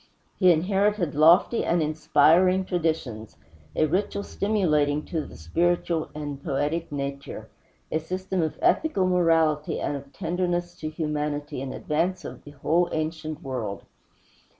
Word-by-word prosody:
He 185 -2 +6
inherited 190 0 +1
lofty 165 +9 +5
and 175 - +1
inspiring 160 +4 +3
traditions, 160 - -2 0.4
a - - +3
ritual 195 +5 -1
stimulating 150 -10 +1
to 160 -3 -2
the - - -12
spiritual 170 - 0
and 145 -2 -6
poetic 150 +3 -1
nature, 140 -1 -5 0.4
a 155 - +1
system 185 +3 -3
of 160 -1 -2
ethical 315 - +2
morality 165 -4 +2
and 145 - -2
of 140 0 -8
tenderness 175 +2 -2
to 155 - -4
humanity 150 -2 -3
in 135 -1 -4
advance 170 +5 -1
of - - -9
the - - -10
whole 160 +5 +1
ancient 155 0 -3
world. 120 -7 -4
160 Hz, 130 wpm, -25 LUFS, 145-180 Hz, 0.4 s, He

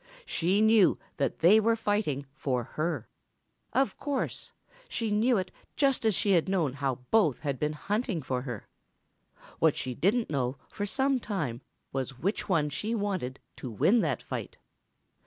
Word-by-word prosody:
She 185 - +1
knew 220 -3 +5 0.2
that 140 - -1
they 190 +7 +7
were 225 +1 +3
fighting 205 -11 -1
for 130 -4 -1
her. 155 +1 -3 0.6
Of 265 +3 +1
course. 285 -2 -3 0.4
She 225 -2 -2
knew 225 +3 +3
it 185 -1 -2 0.2
just 275 -4 +2
as 220 -3 +4
she 200 - +2
had 180 -1 +3
known 170 -9 +1
how 135 -3 -2
both 170 - +3
had 140 -4 -2
been 150 0 0
hunting 205 - -2
for 130 -1 -1
her. 125 -5 -6 0.9
What - - +4
she 130 - -3
didn't 210 - +1
know 130 -2 -1
for 205 -1 -4
some 265 +4 +1
time 155 - -3 0.3
was 135 -1 -3
which 195 - -2
one 150 -5 +2
she 215 +10 -2
wanted 190 - -2 0.2
to 130 - -6
win 185 - +3
that - - 0
fight. - - -5
185 Hz, 160 wpm, -29 LUFS, 135-220 Hz, 0.9 s, they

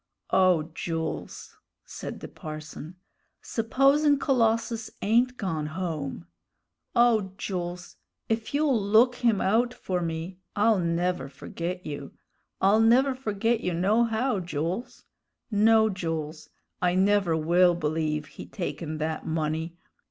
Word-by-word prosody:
"O 175 -4 +3
Jools!" 165 -1 -5 0.3
said - - -7
the - - -6
parson, 155 +2 -8 0.5
"supposin' 275 +6 +3
Colossus 230 -4 +1
ain't 245 +4 +2
gone 160 -6 -2
home! 155 - -4 0.7
O 225 -5 +3
Jools, 180 -3 -5 0.3
if 225 0 -2
you'll 285 -6 +2
look 220 +5 +4
him 230 -5 +2
out 235 +5 +2
for 180 -1 -2
me, 165 +2 -4 0.2
I'll 210 0 +3
never 170 -4 -1
forget 170 +6 -6
you 145 -2 -6 0.5
I'll 200 +3 +4
never 255 +4 +4
forget 225 -2 0
you, 180 -4 -1
nohow, 225 +5 +1
Jools. 175 - -4 0.5
No, 220 +1 +5
Jools, 165 -5 -4 0.3
I 180 0 +2
never 195 -3 +3
will 175 +3 +4
believe 155 -1 -1
he 140 - -11
taken 165 -4 -4
that 155 +1 -3
money. 160 +1 -2
185 Hz, 115 wpm, -27 LUFS, 160-225 Hz, 0.7 s, No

